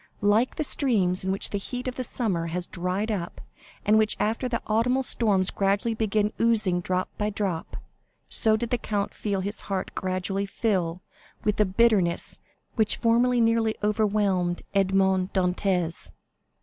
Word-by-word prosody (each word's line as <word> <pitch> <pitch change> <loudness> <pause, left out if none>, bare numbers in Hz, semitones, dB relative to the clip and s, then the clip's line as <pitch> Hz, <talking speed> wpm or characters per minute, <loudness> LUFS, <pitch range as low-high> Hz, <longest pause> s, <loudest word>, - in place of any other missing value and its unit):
Like 215 +5 +2
the 310 - -1
streams 205 -12 +2
which 190 +1 +3
the 200 - -1
heat 250 +5 -6
of 255 - -2
the 255 - -4
summer 195 -9 -1
has 175 +2 -3
dried 185 +6 -2
up, 175 -5 -4 0.5
and 215 +1 +4
which 215 -1 +1
after 230 +4 -1
the 235 - -1
autumnal 250 +5 +1
storms 200 -7 +2
gradually 200 +4 0
begin 215 -1 0
oozing 215 -6 +2
drop 185 +1 -2
by 210 0 0
drop, 195 -5 -3 0.5
so 220 -1 +4
did 235 +1 -4
the 245 - +1
count 205 -2 -2
feel 200 -3 -2
his 200 +3 -5
heart 190 -1 -3
gradually 190 +1 -2
fill 185 -5 -1 0.4
with 210 -1 0
the 210 - +3
bitterness 195 -3 +1 0.3
which 220 -3 +1
formerly 240 +1 +2
nearly 225 -1 +2
overwhelmed 205 -4 0
Edmond 190 -1 +2
Dantès. 180 -2 -1
205 Hz, 150 wpm, -25 LUFS, 185-225 Hz, 0.5 s, and